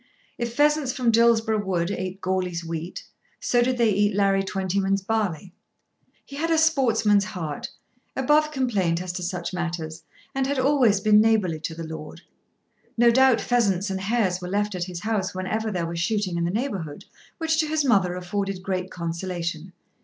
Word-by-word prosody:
If 235 Hz, -1 st, -3 dB
pheasants 295 Hz, -2 st, +3 dB
from 245 Hz, -3 st, +1 dB
Dillsborough 225 Hz, -2 st, +3 dB
Wood 180 Hz, -2 st, -1 dB
ate 185 Hz, 0 st, -4 dB
Goarly's 185 Hz, -2 st, -2 dB
wheat, 165 Hz, +1 st, -5 dB, 0.4 s
so 245 Hz, -, +2 dB
did 250 Hz, +1 st, +1 dB
they 230 Hz, -2 st, +3 dB
eat 205 Hz, 0 st, +2 dB
Larry 195 Hz, -1 st, +3 dB
Twentyman's 195 Hz, 0 st, -1 dB
barley. 195 Hz, -5 st, -2 dB, 0.7 s
He 280 Hz, -, -10 dB
had 330 Hz, +3 st, -1 dB
a 325 Hz, -, +3 dB
sportsman's 230 Hz, -10 st, +3 dB
heart, 160 Hz, -6 st, -5 dB, 0.5 s
above 295 Hz, +3 st, +3 dB
complaint 205 Hz, -, 0 dB
as 180 Hz, 0 st, -4 dB
to 180 Hz, -, -4 dB
such 175 Hz, 0 st, -4 dB
matters, 170 Hz, -2 st, -4 dB, 0.3 s
and 270 Hz, -1 st, 0 dB
had 280 Hz, 0 st, -1 dB
always 260 Hz, -6 st, +3 dB
been 210 Hz, 0 st, +6 dB
neighbourly 210 Hz, -8 st, +2 dB
to 160 Hz, +1 st, -5 dB
the 165 Hz, 0 st, -6 dB
lord. 160 Hz, +1 st, -8 dB, 0.8 s
No 235 Hz, 0 st, +6 dB
doubt 260 Hz, -1 st, +5 dB
pheasants 205 Hz, -5 st, +1 dB
and 190 Hz, 0 st, -3 dB
hares 195 Hz, -4 st, 0 dB
were 180 Hz, -, -5 dB
left 205 Hz, +1 st, 0 dB
at 180 Hz, -1 st, -2 dB
his 175 Hz, -2 st, -7 dB
house 205 Hz, -4 st, -1 dB
whenever 215 Hz, +4 st, -2 dB
there 180 Hz, -5 st, -2 dB
was 170 Hz, 0 st, -4 dB
shooting 190 Hz, 0 st, 0 dB
in 170 Hz, 0 st, 0 dB
the -, -, 0 dB
neighbourhood, 190 Hz, -, -3 dB, 0.3 s
which 320 Hz, -1 st, 0 dB
to 310 Hz, -, +2 dB
his 305 Hz, -1 st, 0 dB
mother 195 Hz, -8 st, +3 dB
afforded 185 Hz, +1 st, -3 dB
great 185 Hz, -1 st, -2 dB
consolation. 170 Hz, 0 st, -4 dB
195 Hz, 175 wpm, -24 LUFS, 180-235 Hz, 0.8 s, been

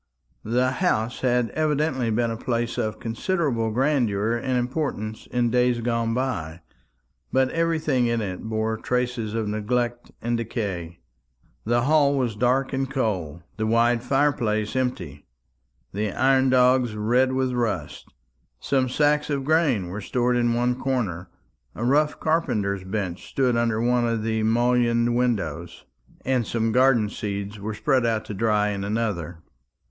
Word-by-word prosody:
The 125 Hz, +3 st, +1 dB
house 130 Hz, -, 0 dB
had 125 Hz, -2 st, +1 dB
evidently 150 Hz, -5 st, 0 dB
been 115 Hz, +1 st, 0 dB
a -, -, -3 dB
place 120 Hz, 0 st, -2 dB
of 110 Hz, -1 st, -2 dB
considerable 120 Hz, -1 st, -1 dB
grandeur 115 Hz, -4 st, +1 dB
and 125 Hz, +2 st, -1 dB
importance 120 Hz, -4 st, -3 dB
in 120 Hz, -1 st, 0 dB
days 125 Hz, 0 st, +2 dB
gone 115 Hz, -1 st, -1 dB
by; 85 Hz, -11 st, -3 dB, 0.7 s
but 130 Hz, 0 st, +2 dB
everything 160 Hz, -6 st, +1 dB
in 115 Hz, 0 st, 0 dB
it 95 Hz, -4 st, -4 dB
bore 110 Hz, 0 st, -2 dB
traces 125 Hz, -2 st, -2 dB
of 110 Hz, -2 st, -1 dB
neglect 120 Hz, +3 st, -2 dB
and 120 Hz, 0 st, -1 dB
decay. 100 Hz, -8 st, -4 dB, 0.7 s
The 120 Hz, +2 st, +2 dB
hall 145 Hz, 0 st, +3 dB
was 120 Hz, -5 st, -1 dB
dark 125 Hz, +5 st, +1 dB
and 135 Hz, 0 st, -1 dB
cold, 90 Hz, -, -2 dB
the 110 Hz, 0 st, -1 dB
wide 115 Hz, +1 st, +3 dB
fire 140 Hz, +4 st, +2 dB
place 110 Hz, -4 st, -2 dB
empty, 90 Hz, -, -3 dB, 0.7 s
the 105 Hz, +1 st, -1 dB
iron 130 Hz, 0 st, +3 dB
dogs 125 Hz, -2 st, +3 dB
red 125 Hz, +5 st, +2 dB
with 130 Hz, -1 st, 0 dB
rust. 105 Hz, -, -2 dB, 0.5 s
Some 130 Hz, -2 st, 0 dB
sacks 150 Hz, +2 st, +2 dB
of 140 Hz, -2 st, -1 dB
grain 145 Hz, -, +2 dB
were 100 Hz, +4 st, -5 dB
stored 125 Hz, +4 st, 0 dB
in 120 Hz, -1 st, +2 dB
one 125 Hz, +1 st, 0 dB
corner, 105 Hz, -10 st, -2 dB, 0.5 s
a 120 Hz, -, -4 dB
rough 150 Hz, +4 st, +2 dB
carpenter's 105 Hz, -, 0 dB
bench 95 Hz, -2 st, -4 dB
stood 130 Hz, -3 st, +1 dB
under 115 Hz, -2 st, +1 dB
one 120 Hz, 0 st, +2 dB
of 115 Hz, -2 st, -1 dB
the 110 Hz, 0 st, 0 dB
mullioned 120 Hz, +1 st, +2 dB
windows, 115 Hz, -12 st, -2 dB, 0.4 s
and 125 Hz, -4 st, +1 dB
some 115 Hz, -1 st, 0 dB
garden 125 Hz, -3 st, +4 dB
seeds 100 Hz, 0 st, -5 dB
were 105 Hz, +1 st, -4 dB
spread 130 Hz, +2 st, +1 dB
out 115 Hz, -2 st, 0 dB
to -, -, -6 dB
dry 105 Hz, 0 st, +1 dB
in 100 Hz, -1 st, -3 dB
another. 100 Hz, -6 st, -3 dB
120 Hz, 150 wpm, -24 LUFS, 110-130 Hz, 0.7 s, garden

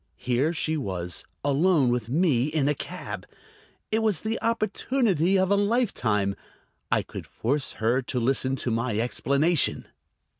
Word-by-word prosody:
Here 125 Hz, +6 st, +1 dB
she 160 Hz, -1 st, -1 dB
was, 90 Hz, -, -3 dB, 0.2 s
alone 145 Hz, -1 st, +3 dB
with 120 Hz, -2 st, -1 dB
me 140 Hz, -4 st, +2 dB
in 150 Hz, -2 st, 0 dB
a 150 Hz, -, +3 dB
cab. -, -, -7 dB, 0.6 s
It 220 Hz, +1 st, +2 dB
was 215 Hz, -6 st, +1 dB
the 220 Hz, +1 st, -2 dB
opportunity 215 Hz, -, +1 dB
of 190 Hz, +1 st, +2 dB
a -, -, +5 dB
lifetime. 200 Hz, -, +1 dB, 0.6 s
I -, -, +2 dB
could -, -, -9 dB
force 135 Hz, +4 st, -2 dB
her 115 Hz, +4 st, +1 dB
to 125 Hz, 0 st, -2 dB
listen 130 Hz, +2 st, +1 dB
to 125 Hz, -2 st, -3 dB
my 115 Hz, -1 st, -1 dB
explanation. 140 Hz, +8 st, +2 dB
145 Hz, 145 wpm, -26 LUFS, 120-190 Hz, 0.6 s, a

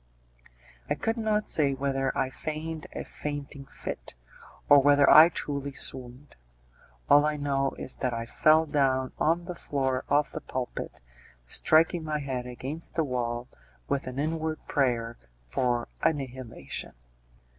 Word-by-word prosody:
I -, -, +1 dB
could 225 Hz, 0 st, -1 dB
not 215 Hz, -2 st, 0 dB
say 140 Hz, -3 st, +2 dB
whether 135 Hz, 0 st, 0 dB
I 130 Hz, -, 0 dB
feigned 155 Hz, +3 st, -5 dB
a -, -, -3 dB
fainting 145 Hz, -1 st, -6 dB
fit, -, -, -6 dB, 0.5 s
or 145 Hz, -, +8 dB
whether 145 Hz, +1 st, +5 dB
I 160 Hz, +2 st, +9 dB
truly 140 Hz, -4 st, -3 dB
swooned; 130 Hz, +1 st, -3 dB, 0.7 s
all 145 Hz, 0 st, +7 dB
I 150 Hz, 0 st, 0 dB
know 140 Hz, -1 st, 0 dB
is -, -, -6 dB
that 125 Hz, -, -1 dB
I 115 Hz, -1 st, -3 dB
fell 155 Hz, +6 st, +4 dB
down 130 Hz, -3 st, +1 dB
on 170 Hz, +2 st, +2 dB
the 180 Hz, -, -5 dB
floor 135 Hz, -5 st, -1 dB
of 145 Hz, -1 st, +2 dB
the -, -, -6 dB
pulpit, 130 Hz, -1 st, -5 dB, 0.4 s
striking 160 Hz, -, +3 dB
my 155 Hz, -1 st, -1 dB
head 130 Hz, -4 st, -4 dB
against 135 Hz, +6 st, -5 dB
the 165 Hz, -, +2 dB
wall, 120 Hz, -3 st, -2 dB, 0.4 s
with 140 Hz, -1 st, -1 dB
an 130 Hz, 0 st, -6 dB
inward 155 Hz, +1 st, -1 dB
prayer 120 Hz, -5 st, 0 dB, 0.3 s
for 120 Hz, -, -1 dB
annihilation. 130 Hz, -, -3 dB
140 Hz, 140 wpm, -28 LUFS, 130-155 Hz, 0.7 s, I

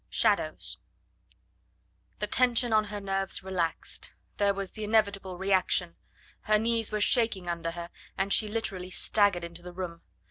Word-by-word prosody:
SHADOWS -, -, +1 dB, 1.4 s
The 210 Hz, -, -1 dB
tension 240 Hz, +1 st, +2 dB
on 215 Hz, 0 st, +4 dB
her 205 Hz, 0 st, -5 dB
nerves 195 Hz, -1 st, -1 dB
relaxed; 180 Hz, -4 st, -2 dB, 0.2 s
there 200 Hz, -1 st, +3 dB
was 195 Hz, -1 st, -4 dB
the 215 Hz, -, -7 dB
inevitable 200 Hz, -4 st, +1 dB
reaction. 185 Hz, -2 st, +1 dB, 0.5 s
Her 215 Hz, 0 st, +4 dB
knees 225 Hz, 0 st, +1 dB
were 210 Hz, -, -1 dB
shaking 210 Hz, -4 st, +2 dB
under 170 Hz, -1 st, -2 dB
her, 170 Hz, +1 st, -7 dB, 0.3 s
and 195 Hz, +1 st, +1 dB
she 215 Hz, -, +4 dB
literally 195 Hz, -4 st, -3 dB
staggered 200 Hz, -1 st, +2 dB
into 170 Hz, 0 st, -8 dB
the 180 Hz, 0 st, -9 dB
room. 175 Hz, -2 st, -6 dB
195 Hz, 145 wpm, -29 LUFS, 180-215 Hz, 1.4 s, on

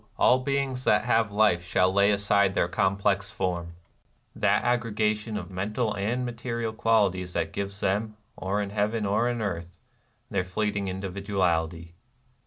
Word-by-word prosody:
All 130 Hz, -, +5 dB
beings 135 Hz, -1 st, -1 dB
that -, -, +4 dB
have 115 Hz, -3 st, +2 dB
life 105 Hz, -4 st, +3 dB
shall 90 Hz, +1 st, +2 dB
lay 100 Hz, +1 st, +4 dB
Aside 100 Hz, -1 st, +2 dB
their -, -, +2 dB
complex 100 Hz, +2 st, +1 dB
form, 90 Hz, -5 st, -3 dB, 0.3 s
— -, -, -41 dB
that -, -, +2 dB
aggregation 110 Hz, -3 st, 0 dB
Of 100 Hz, -, -7 dB
mental 105 Hz, +5 st, -1 dB
and 115 Hz, +6 st, -1 dB
material 115 Hz, -1 st, -3 dB
qualities 100 Hz, -5 st, +1 dB
That 80 Hz, 0 st, -2 dB
gives 100 Hz, 0 st, -4 dB
them, 105 Hz, +3 st, -1 dB, 0.2 s
or 100 Hz, +2 st, -1 dB
in 100 Hz, -, -6 dB
heaven 105 Hz, +1 st, 0 dB
or 105 Hz, +5 st, +1 dB
on 120 Hz, -2 st, -2 dB
earth, 85 Hz, -3 st, -4 dB, 0.6 s
Their 95 Hz, -2 st, +1 dB
fleeting 100 Hz, +2 st, -2 dB
individuality." 90 Hz, -4 st, -2 dB
100 Hz, 150 wpm, -27 LUFS, 95-110 Hz, 0.6 s, All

